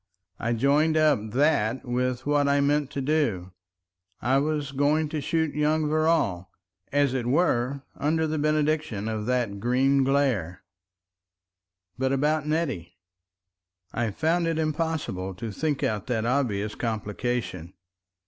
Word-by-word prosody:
I 120 - 0
joined 145 +6 +3
up 150 -9 +2
that 130 -2 +1
with 125 0 -1
what 145 0 +2
I 140 0 +3
meant 145 0 +1
to 140 -1 -4
do. 130 - 0 0.7
I 130 +4 +2
was 150 -1 -1
going 145 +3 +1
to 155 -1 -3
shoot 160 0 0
young 150 +1 +1
Verrall 155 - +1 0.4
as 140 -1 +2
it 125 -3 -2
were 140 -2 +1
under 160 +2 0
the 155 0 -1
benediction 150 -7 0
of 110 -1 -3
that 120 -5 0
green 135 +4 +2
glare. 130 - 0 1.4
But 130 0 +1
about 150 +2 +1
Nettie? 140 - -2 1.0
I 115 -1 0
found 165 - 0
it 165 -1 0
impossible 155 - -2
to 110 +4 -5
think 150 +6 -2
out 105 -3 -1
that 115 -3 -1
obvious 110 -5 0
complication. 110 -5 -3
140 Hz, 130 wpm, -26 LUFS, 115-155 Hz, 1.4 s, joined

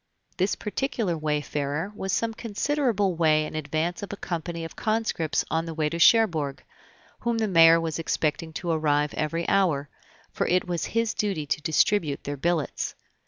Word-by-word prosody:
This 190 +2 +1
particular 215 -5 -2
wayfarer 150 +3 -2
was 190 -1 -3
some 225 +4 0
considerable 225 -2 0
way 155 -2 +3
in - - -7
advance 155 +3 -2
of 200 - -6
a 205 - -5
company 170 -2 -4
of 165 - -9
conscripts 215 -9 0
on 160 +1 0
the 165 - -5
way 155 -1 0
to 170 - -4
Cherbourg, 165 -10 +4 0.6
whom 235 -1 -1
the 220 -1 +1
mayor 165 -3 +7
was 165 -1 -3
expecting 160 0 -1
to 170 +1 -3
arrive 150 -2 +1
every 165 +2 -2
hour, 160 -8 +2 0.4
for - - -1
it 180 +1 +2
was 175 -3 -2
his 230 -1 +1
duty 195 -8 -1
to 150 - -1
distribute 160 -1 +1
their 145 - -4
billets. 165 +1 -1
165 Hz, 165 wpm, -26 LUFS, 155-200 Hz, 0.6 s, mayor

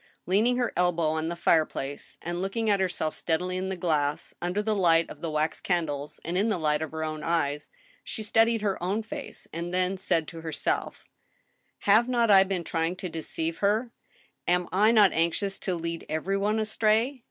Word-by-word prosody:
Leaning 220 +7 +2
her 245 -2 0
elbow 170 -3 +2
on 160 +1 -1
the 170 - -3
fireplace, 155 -4 0
and 175 +1 -3
looking 215 +3 0
at 200 - +2
herself 175 -4 -1
steadily 180 +2 -1
in 185 +1 -2
the 190 - -3
glass, 150 -4 -1
under 180 +3 -1
the 215 +1 0
light 170 -4 +4
of 150 - -11
the 165 - -3
wax 155 +1 -1
candles 150 -5 -2
and 175 +3 -1
in 215 +3 +2
the 210 - +1
light 150 -2 +1
of 160 - -3
her 160 0 -4
own 155 -1 -4
eyes, 150 -3 -1 0.3
she 220 - -4
studied 225 +1 +3
her 200 -4 -1
own 195 +5 -1
face 280 +5 -8
and 170 +2 -4
then 185 +1 +1
said 165 -4 0
to 165 -1 -8
herself: 160 -2 -2 0.4
* - - -25
"Hiave 220 +4 +5
not 235 -3 +2
I 190 -1 +8
been 190 -2 -2
trying 165 +2 -1
to 185 -1 -6
deceive 160 0 -3
her 215 +4 +1 0.3
— - - -36
am 180 - -6
I 210 +4 +4
not 210 -5 +6
anxious 170 +4 0
to 185 - -2
lead 165 0 -5
every 160 +5 -1
one 205 +2 +1
astray 220 +4 +1
180 Hz, 200 wpm, -27 LUFS, 160-205 Hz, 0.4 s, I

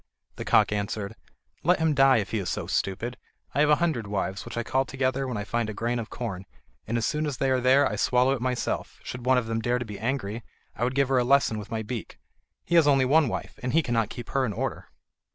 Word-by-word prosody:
The - - -5
cock - - +4
answered: 105 0 -3 0.5
"Let 180 +3 +3
him 160 -1 +2
die, 135 -2 +5
if 105 -3 -2
he 110 - 0
is 95 - -3
so - - -3
stupid. 110 +6 -2 0.4
I - - -1
have 150 0 +4
a 150 - +7
hundred 155 -10 -1
wives, 95 -1 -3
which 120 0 -7
I 120 - 0
call 130 +3 +1
together 130 0 -1
when 125 -4 -3
I 105 - -3
find 115 +1 -1
a 110 - -5
grain 120 +2 -1
of 115 - -5
corn, 100 -6 -5 0.4
and 115 +2 0
as 115 - 0
soon 155 0 0
as 140 -3 -3
they 135 -1 +1
are 130 - +3
there 130 0 +5
I 105 -1 -3
swallow 125 +5 +3
it 130 - -3
myself; 125 -1 -2
should 125 0 -7
one 130 0 +5
of 125 - +1
them 115 0 -2
dare 120 +2 +1
to 125 - -4
be 105 -3 -8
angry, 115 -2 -2 0.3
I 120 - 0
would 125 +1 -2
give 140 -1 +2
her 130 -1 +3
a - - +2
lesson 125 -4 +3
with 105 - -8
my 110 -1 -3
beak. 115 0 -6 0.5
He - - -4
has 165 -3 +6
only 135 -2 +4
one 150 +3 +4
wife, - - -5
and 125 - -2
he 165 +1 +4
cannot 115 -5 0
keep 120 - -8
her 135 - +1
in 115 -5 -1
order." - - -3
125 Hz, 260 wpm, -26 LUFS, 110-135 Hz, 0.5 s, a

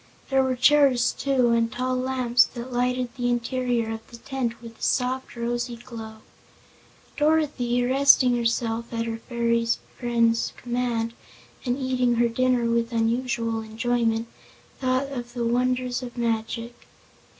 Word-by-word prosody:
There 270 0 +4
were 260 -1 0
chairs, 255 -1 +4
too, 265 -3 +1
and 230 -1 +2
tall 255 +2 -1
lamps 255 -1 +3
that 245 +1 -6
lighted 250 0 0
the 245 -1 -1
interior 240 -1 0
of 225 - -4
the 235 - -11
tent 240 -2 -3
with 230 -1 -12
a - - -21
soft, 255 0 -1
rosy 240 0 -2
glow. 225 -2 -10 0.9
Dorothy, 295 -6 +2
resting 260 -1 +5
herself 235 -1 -1
at 230 -1 -2
her 225 0 -3
fairy 235 0 0 0.4
friend's 230 -2 +1
command, 240 -2 -2 0.5
and 245 0 0
eating 255 -2 +1
her 235 0 +3
dinner 250 0 +1
with 230 0 +1
unusual 230 0 0
enjoyment, 225 0 0 0.5
thought 255 +1 +1
of 240 -3 -6
the 240 -1 -2
wonders 250 +1 0
of 245 -1 -8
magic. 230 +1 -3
240 Hz, 140 wpm, -25 LUFS, 230-255 Hz, 0.9 s, resting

